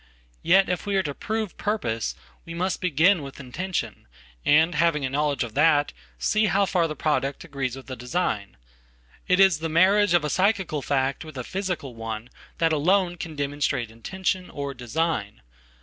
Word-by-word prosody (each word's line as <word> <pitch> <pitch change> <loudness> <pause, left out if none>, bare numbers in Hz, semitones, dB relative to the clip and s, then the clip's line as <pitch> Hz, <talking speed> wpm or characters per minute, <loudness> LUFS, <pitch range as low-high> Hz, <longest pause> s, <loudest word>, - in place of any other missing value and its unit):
Yet 190 +2 +5
if 180 +3 -2
we 200 - 0
areto 155 -8 -1
prove 220 -3 -3
purpose 115 - -2 0.3
we 165 - -8
must 185 +2 -1
begin 175 +2 +3
with 135 -1 -9
intention, 175 - -4 0.4
and 160 +4 +4
having 160 -2 +2
aknowledge 140 0 0
of 115 -3 -7
that 145 0 +3 0.2
see 215 0 +2
how 200 +1 +3
far 175 -3 +1
the 155 - -5
product 145 0 -1
agrees 135 -6 -3
with 135 - -10
the 130 - -6
design.It 60 - -4
is 190 -5 +5
the 165 0 -3
marriage 190 +4 +4
of 165 -3 +2
a - - -1
psychical 190 -6 +1
fact 135 -1 0
with 155 -3 -10
a 125 - -3
physical 180 -6 -4
one 115 +1 -6 0.3
thatalone 175 +3 +2
can 160 -2 -6
demonstrate 140 -5 -1
intention, 185 - -3
or 140 -1 -5
design. 125 - -2
155 Hz, 160 wpm, -25 LUFS, 130-185 Hz, 0.4 s, Yet